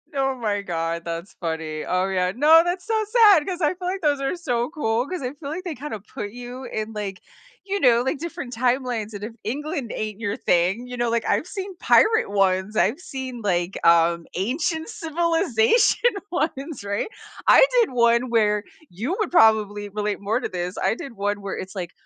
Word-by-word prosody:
Oh 270 Hz, -1 st, +1 dB
my 210 Hz, -4 st, -1 dB
god, 170 Hz, -2 st, -3 dB
that's 170 Hz, +2 st, -6 dB
funny. 160 Hz, -2 st, -3 dB
Oh, 185 Hz, +1 st, 0 dB
yeah, 185 Hz, -1 st, 0 dB
no, 310 Hz, +5 st, +7 dB
that's 355 Hz, +1 st, -3 dB
so 440 Hz, -1 st, +1 dB
sad 415 Hz, -10 st, +6 dB
'cause 365 Hz, -1 st, -4 dB
I 300 Hz, +2 st, +2 dB
feel 360 Hz, 0 st, -6 dB
like 380 Hz, +1 st, -2 dB
those 290 Hz, -3 st, +1 dB
are 275 Hz, +6 st, -1 dB
so 245 Hz, -7 st, -1 dB
cool 245 Hz, -7 st, -1 dB
'cause 365 Hz, -5 st, -4 dB
I 250 Hz, +1 st, -4 dB
feel 290 Hz, -1 st, -8 dB
like 345 Hz, +4 st, -5 dB
they 330 Hz, -, -4 dB
kinda 255 Hz, -5 st, -6 dB
put 205 Hz, +1 st, -7 dB
you 245 Hz, +2 st, -8 dB
in, 220 Hz, -3 st, -4 dB
like, 200 Hz, -3 st, -5 dB, 0.5 s
you 400 Hz, 0 st, -2 dB
know, 240 Hz, -3 st, +5 dB
like 265 Hz, +4 st, -1 dB
different 325 Hz, -6 st, -6 dB
timelines, 245 Hz, -3 st, -1 dB
and 205 Hz, 0 st, -5 dB
if 225 Hz, -, -8 dB
England 285 Hz, +1 st, -3 dB
ain't 215 Hz, 0 st, -4 dB
your 205 Hz, -2 st, -2 dB
thing, 185 Hz, +8 st, +1 dB
you 250 Hz, -, -6 dB
know, 240 Hz, -1 st, 0 dB
like, 230 Hz, 0 st, 0 dB
I've -, -, +1 dB
seen 385 Hz, 0 st, -6 dB
pirate 440 Hz, -, +4 dB
ones, 195 Hz, +1 st, +1 dB
I've 265 Hz, +10 st, +2 dB
seen 260 Hz, -6 st, -6 dB
like, 180 Hz, -2 st, -1 dB
um, 170 Hz, 0 st, +4 dB
ancient 320 Hz, -, -1 dB
civilization 330 Hz, -, +2 dB, 0.2 s
ones, 310 Hz, -, -3 dB
right? 200 Hz, -, -2 dB, 0.4 s
I -, -, +7 dB, 0.2 s
did 445 Hz, -, 0 dB
one 235 Hz, 0 st, +3 dB
where- 210 Hz, -3 st, +2 dB, 0.3 s
you 245 Hz, -, -3 dB
would 430 Hz, -, -1 dB
probably 210 Hz, -, +3 dB
relate 205 Hz, 0 st, -3 dB
more 215 Hz, +4 st, 0 dB
to -, -, -3 dB
this- 180 Hz, +1 st, -4 dB
I -, -, +2 dB
did 275 Hz, -, -8 dB
one 205 Hz, -1 st, -2 dB
where 200 Hz, -1 st, -5 dB
it's 190 Hz, +1 st, -7 dB
like, 180 Hz, -2 st, -4 dB
235 Hz, 195 wpm, -23 LUFS, 200-310 Hz, 0.5 s, no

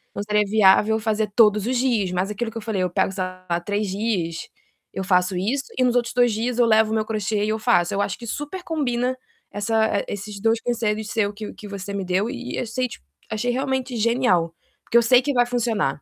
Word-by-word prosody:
Não 200 Hz, -, -3 dB
seria 210 Hz, 0 st, +2 dB
viável 215 Hz, +1 st, +4 dB
fazer 215 Hz, -1 st, -1 dB
todos 210 Hz, -3 st, +5 dB
os 255 Hz, -, 0 dB
dias, 235 Hz, -7 st, +1 dB
mas 185 Hz, +2 st, -1 dB
aquilo 225 Hz, +3 st, -3 dB
que 230 Hz, -, -8 dB
eu -, -, -5 dB
falei, 210 Hz, -3 st, -2 dB
eu 180 Hz, -, 0 dB
pego, 175 Hz, -, 0 dB
sei 190 Hz, -1 st, -3 dB
lá, 185 Hz, -1 st, -4 dB
3 205 Hz, +4 st, -2 dB
dias, 190 Hz, -5 st, -2 dB, 0.4 s
eu 190 Hz, -, -4 dB
faço 180 Hz, -1 st, +2 dB
isso 245 Hz, +10 st, -1 dB
e 255 Hz, -, +3 dB
nos 245 Hz, -1 st, +2 dB
outros 240 Hz, 0 st, +1 dB
2 245 Hz, -2 st, +4 dB
dias 235 Hz, +3 st, -2 dB
eu 240 Hz, -, +5 dB
levo 220 Hz, -1 st, +4 dB
o -, -, +1 dB
meu 215 Hz, -1 st, 0 dB
crochê 215 Hz, -1 st, -1 dB
e 215 Hz, -, -2 dB
eu 220 Hz, -, -1 dB
faço. 215 Hz, -7 st, +2 dB
Eu 200 Hz, -, 0 dB
acho 200 Hz, -2 st, -2 dB
que 235 Hz, -, -10 dB
super 295 Hz, -, -5 dB
combina 255 Hz, -5 st, -1 dB, 0.4 s
essa 220 Hz, 0 st, +1 dB
e -, -, -3 dB
esses 200 Hz, 0 st, -7 dB
2 225 Hz, 0 st, +2 dB
conselhos 220 Hz, -3 st, -1 dB
seu 210 Hz, -3 st, 0 dB
que 210 Hz, 0 st, -7 dB
que 210 Hz, -, -11 dB
você 200 Hz, 0 st, -6 dB
me 200 Hz, -1 st, -2 dB
deu 185 Hz, +4 st, 0 dB
e 250 Hz, -1 st, -5 dB
eu -, -, -2 dB
sei, 250 Hz, +3 st, -2 dB
ti -, -, -11 dB, 0.3 s
achei 220 Hz, +3 st, -1 dB
realmente 265 Hz, 0 st, -2 dB
genial, 225 Hz, -8 st, +2 dB, 0.3 s
porque 235 Hz, -, +2 dB
eu -, -, +7 dB
sei 250 Hz, +2 st, +5 dB
que 285 Hz, +2 st, -1 dB
vai 245 Hz, -1 st, +3 dB
funcionar. 225 Hz, -, -1 dB
220 Hz, 235 wpm, -23 LUFS, 200-240 Hz, 0.4 s, eu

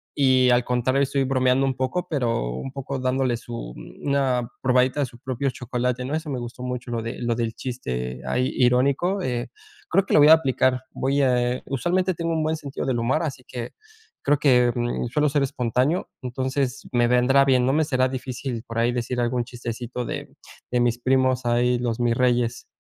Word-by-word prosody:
y 130 Hz, -2 st, +4 dB
al 120 Hz, 0 st, +4 dB
contrario 125 Hz, +2 st, +1 dB
estoy 135 Hz, 0 st, 0 dB
bromeando 130 Hz, 0 st, +2 dB
un 135 Hz, -, 0 dB
poco, 130 Hz, +8 st, -2 dB
pero 120 Hz, -, 0 dB
un 65 Hz, -, -5 dB
poco 135 Hz, 0 st, -5 dB
dándole 130 Hz, -1 st, 0 dB
su 115 Hz, -, -7 dB
mm, -, -, -10 dB
una 130 Hz, -4 st, +1 dB
probadita 130 Hz, +2 st, +2 dB
de 140 Hz, -, 0 dB
su 120 Hz, -1 st, -15 dB
propio 130 Hz, +2 st, -2 dB
chocolate, 125 Hz, 0 st, -2 dB
¿no? 135 Hz, -, -4 dB
Eso 160 Hz, -1 st, -4 dB
me 135 Hz, -, -2 dB
gustó 120 Hz, +1 st, -8 dB
mucho, 125 Hz, -1 st, -4 dB
lo 115 Hz, -1 st, -1 dB
de 115 Hz, +1 st, -5 dB
lo 120 Hz, 0 st, +1 dB
del 115 Hz, -1 st, -2 dB
chiste 65 Hz, -, -4 dB
ahí 125 Hz, +1 st, 0 dB
irónico, 135 Hz, +10 st, +2 dB
eh, 120 Hz, -4 st, -2 dB, 0.4 s
creo 195 Hz, -, +3 dB
que -, -, -2 dB
lo -, -, +7 dB
voy 145 Hz, +1 st, +7 dB
a -, -, +11 dB
aplicar. 130 Hz, -4 st, +2 dB
Voy 140 Hz, +2 st, 0 dB
a, 125 Hz, -1 st, +2 dB
eh, 125 Hz, -, -6 dB
usualmente 180 Hz, +8 st, 0 dB
tengo 165 Hz, 0 st, -2 dB
un 160 Hz, -1 st, 0 dB
buen 155 Hz, +1 st, 0 dB
sentido 140 Hz, -3 st, -5 dB
del 125 Hz, -3 st, 0 dB
humor, 130 Hz, +8 st, +1 dB
así 135 Hz, -5 st, -4 dB
que, 120 Hz, -1 st, -6 dB, 0.5 s
creo 145 Hz, 0 st, +2 dB
que, 125 Hz, -4 st, +4 dB
mm, 120 Hz, 0 st, -1 dB
suelo 150 Hz, +5 st, +1 dB
ser 140 Hz, 0 st, +1 dB
espontáneo, 130 Hz, +4 st, 0 dB
entonces 130 Hz, +1 st, -2 dB
me 120 Hz, -1 st, +3 dB
vendrá 125 Hz, +3 st, +4 dB
bien. 130 Hz, -2 st, +3 dB
No 130 Hz, -, +3 dB
me 155 Hz, +1 st, +2 dB
será 130 Hz, -3 st, +1 dB
difícil 130 Hz, -2 st, -4 dB
por 115 Hz, -, -6 dB
ahí 120 Hz, +1 st, +2 dB
decir 125 Hz, 0 st, -2 dB
algún 120 Hz, 0 st, 0 dB
chistecito 120 Hz, 0 st, -5 dB
de -, -, -5 dB, 0.4 s
de 125 Hz, -, +2 dB
mis 120 Hz, 0 st, +1 dB
primos 130 Hz, 0 st, +2 dB
ahí, 120 Hz, +1 st, +2 dB
los 120 Hz, -2 st, -2 dB
mirreyes. 120 Hz, 0 st, +1 dB
125 Hz, 200 wpm, -24 LUFS, 120-135 Hz, 0.5 s, a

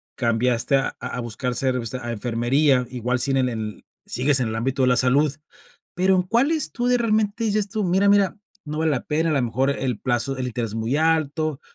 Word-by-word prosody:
cambiaste 120 Hz, +1 st, +1 dB
a 135 Hz, -, 0 dB
a -, -, -5 dB
buscar 120 Hz, +2 st, -4 dB
ser 130 Hz, 0 st, 0 dB
o 120 Hz, -, -4 dB
sea, 130 Hz, +3 st, -5 dB
a 120 Hz, -, -3 dB
enfermería, 125 Hz, +4 st, +1 dB
igual 125 Hz, 0 st, -2 dB
si 135 Hz, +2 st, +1 dB
en 130 Hz, -2 st, +2 dB
en 110 Hz, -3 st, -5 dB, 0.2 s
sigues 135 Hz, +2 st, +3 dB
en 125 Hz, -, 0 dB
el 110 Hz, -, -4 dB
ámbito 130 Hz, +4 st, -1 dB
de 130 Hz, -, +3 dB
la 125 Hz, -, +4 dB
salud. 135 Hz, +3 st, +3 dB, 0.6 s
Pero, 190 Hz, +1 st, +2 dB
¿en 180 Hz, -, +2 dB
cuáles 265 Hz, -, +1 dB
tú 245 Hz, -1 st, -2 dB
de 250 Hz, 0 st, +3 dB
realmente 220 Hz, -1 st, 0 dB
dices 210 Hz, -2 st, 0 dB
tú: 210 Hz, +1 st, -2 dB
"Mira, 190 Hz, +3 st, +2 dB
mira, 200 Hz, -1 st, +3 dB, 0.3 s
no 150 Hz, 0 st, -5 dB
vale 160 Hz, 0 st, +1 dB
la 135 Hz, -4 st, -1 dB
pena", 160 Hz, +2 st, 0 dB
a -, -, +1 dB
la 140 Hz, -3 st, +1 dB
mejor, 130 Hz, +3 st, 0 dB
el 130 Hz, -5 st, -2 dB
plazo, 120 Hz, +3 st, -1 dB
el 130 Hz, -1 st, -3 dB
interés 120 Hz, -2 st, -3 dB
es -, -, -8 dB
muy 115 Hz, +4 st, -1 dB
alto, 155 Hz, -1 st, 0 dB
135 Hz, 225 wpm, -23 LUFS, 125-165 Hz, 0.6 s, la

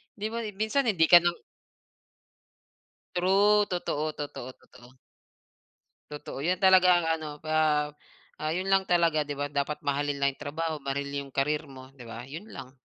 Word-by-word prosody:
Di 210 Hz, +1 st, -3 dB
ba, 230 Hz, -, -3 dB
eh, 210 Hz, -, -6 dB
minsan 225 Hz, +5 st, 0 dB
hindi 180 Hz, -7 st, +2 dB
ka 175 Hz, -, +10 dB
na 175 Hz, 0 st, +1 dB, 1.8 s
True, 200 Hz, +3 st, +4 dB
totoo, 155 Hz, -4 st, -2 dB
totoo, 130 Hz, -4 st, -7 dB
totoo. 125 Hz, +1 st, -19 dB, 1.1 s
Totoo 145 Hz, -2 st, -7 dB
'yan 180 Hz, +5 st, 0 dB
talaga, 185 Hz, -1 st, +6 dB
ang 175 Hz, -, -1 dB, 0.2 s
ano 155 Hz, -, -5 dB
pa 155 Hz, +1 st, -5 dB, 0.9 s
ah, 155 Hz, -, -1 dB
'yon 180 Hz, +4 st, -2 dB
lang 195 Hz, 0 st, +3 dB
talaga, 170 Hz, -3 st, +3 dB
'di 145 Hz, -1 st, -5 dB
ba, 145 Hz, -, -1 dB
dapat 145 Hz, +1 st, -2 dB
mahalin 145 Hz, 0 st, -1 dB
lang 140 Hz, 0 st, +1 dB
'yong -, -, -25 dB
trabaho, 155 Hz, +1 st, -3 dB
mahalin 140 Hz, +1 st, -3 dB
'yong 140 Hz, -1 st, -4 dB
career 140 Hz, +2 st, -1 dB
mo, 130 Hz, 0 st, -13 dB
'di 135 Hz, -, -16 dB
ba? 115 Hz, +1 st, -8 dB
Yon 160 Hz, +11 st, -9 dB
lang. 130 Hz, -1 st, -10 dB
155 Hz, 170 wpm, -28 LUFS, 140-185 Hz, 1.8 s, ka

